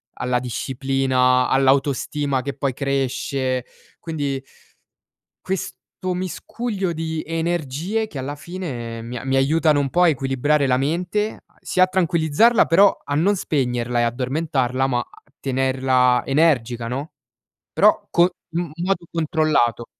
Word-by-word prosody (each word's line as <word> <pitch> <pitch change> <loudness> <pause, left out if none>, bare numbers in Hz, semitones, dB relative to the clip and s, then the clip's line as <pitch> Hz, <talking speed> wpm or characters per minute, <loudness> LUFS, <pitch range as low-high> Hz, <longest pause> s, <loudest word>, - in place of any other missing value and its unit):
alla 125 0 0
disciplina, 130 +1 +1
all'autostima 135 0 +1
che 140 - -3
poi 140 -1 -1
cresce, 130 -1 -1 0.3
quindi 145 -5 -3 1.0
questo 185 0 -5
miscuglio 190 +2 -3
di 160 0 -3
energie 165 +5 -2
che 155 - -9
alla 135 +2 -4
fine 135 -10 -6
mi 120 +2 -6
a 125 - -7
mi 135 0 0
aiutano 150 +2 +3
un 140 -1 0
po' 180 - +2
a 175 - +6
equilibrare 140 +1 +1
la 125 -1 +3
mente, 180 +9 -1
a - - -34
sì - - -3
a 185 - +8
tranquillizzarla, 185 +4 +3
però 195 +4 +5
a 145 - -4
non 190 +7 +3
spegnerla 125 -8 -1
e - - +3
addormentarla, 130 +1 0
ma 120 -2 0
a - - -15 0.2
tenerla 130 -1 +2
energica, 125 -6 +1
no, 135 +6 -4 0.6
però - - +3
co 170 - +4
i - - +1 0.3
in 170 -3 -2
modo 185 -3 -1
controllato. 155 -8 +1
140 Hz, 135 wpm, -21 LUFS, 130-165 Hz, 1.0 s, a